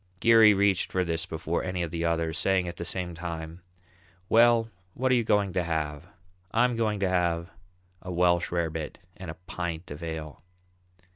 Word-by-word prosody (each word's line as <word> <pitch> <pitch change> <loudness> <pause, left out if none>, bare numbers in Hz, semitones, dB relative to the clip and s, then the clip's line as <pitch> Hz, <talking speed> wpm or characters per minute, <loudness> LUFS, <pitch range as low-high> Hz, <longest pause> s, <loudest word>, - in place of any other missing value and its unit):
Geary 110 -1 +7
reached 100 -1 +2
for 95 - +1
this 85 +1 -1
before 80 0 -2
any 90 -1 -2
of 85 - -4
the 85 -1 -3
others, 80 -1 0
saying 95 0 +1
at 85 - -6
the 85 - -5
same 90 0 -2
time, 85 0 -6 0.7
"Well, 115 0 +5 0.2
what 130 +1 +1
are - - +5
you 120 -2 +3
going 105 -3 +1
to 90 - +1
have? 80 -1 -3 0.4
I'm 120 +2 +2
going 110 -2 0
to 95 - +2
have 85 -2 0 0.5
a 90 - -7
Welsh 85 0 +2
rabbit 80 -2 -2 0.2
and 95 -3 -9
a 80 - -6
pint 85 -1 -5
of 75 +3 -7
ale." 80 -2 -6
85 Hz, 180 wpm, -27 LUFS, 80-100 Hz, 0.7 s, Geary